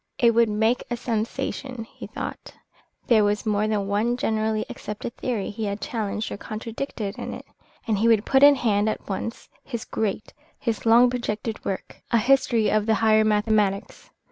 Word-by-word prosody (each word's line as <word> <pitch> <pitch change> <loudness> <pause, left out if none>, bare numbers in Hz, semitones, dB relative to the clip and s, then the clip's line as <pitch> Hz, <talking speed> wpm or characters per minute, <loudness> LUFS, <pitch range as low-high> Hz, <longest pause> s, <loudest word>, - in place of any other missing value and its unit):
It 235 -1 +4
would 230 0 +4
make 220 +3 +1
a 240 - -2
sensation, 235 +2 -3
he 225 - -11
thought; - - -7 0.5
there 220 -3 +5
was 205 +1 0
more 210 0 +1
than 210 -2 0
one 215 +5 0
generally 220 -2 0
accepted 210 +2 -6
theory 230 -6 -2
he 215 +1 -4
had 200 0 -3
challenged 215 -1 -3
or - - -4
contradicted 220 0 -5
in - - -5
it. - - -10 0.4
And 215 -3 0
he 225 - +3
would 225 -2 +4
put 265 0 +3
in 285 0 +9
hand 215 -4 +1
at - - -5
once 220 +4 -4 0.2
his 235 -2 -5
great, 215 -1 -3 0.2
his 230 -1 -2
long 240 +2 +6
projected 225 -2 -3
work, 190 - -5
"A 235 - +3
History 235 -1 +3
of 215 0 +1
the 220 - +4
Higher 220 0 +4
Mathematics." 210 -2 0
220 Hz, 175 wpm, -24 LUFS, 210-235 Hz, 0.5 s, in